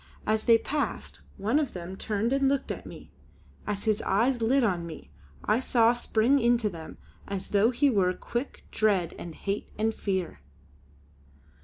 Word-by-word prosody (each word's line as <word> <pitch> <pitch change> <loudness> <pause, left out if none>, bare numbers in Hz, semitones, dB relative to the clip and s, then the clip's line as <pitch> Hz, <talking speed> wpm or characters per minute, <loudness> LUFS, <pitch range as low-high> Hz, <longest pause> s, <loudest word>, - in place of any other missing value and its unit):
As 215 0 0
they 230 -2 +7
passed, 290 +5 -3 0.2
one 225 +9 +1
of 290 -5 -2
them 180 +1 -6
turned 215 +5 -1
and 275 0 +3
looked 275 -1 -1
at - - -6
me. - - -11 0.6
As 205 -1 -2
his 215 -1 +1
eyes 235 +5 +1
lit 255 +4 +3
on 180 -6 +1
me, 75 - -10 0.3
I 215 +3 +3
saw 235 -2 +4
spring 240 +3 +2
into 235 -3 +2
them, 165 -2 -9 0.3
as 195 -2 -4
though 205 +3 +4
he 265 +4 +2
were 190 -5 +3
quick, 240 +4 -5
dread, 195 -6 +1
and 170 -2 -7
hate, 200 +1 -3
and 220 +1 +1
fear. 190 - -3
220 Hz, 165 wpm, -28 LUFS, 195-240 Hz, 0.6 s, they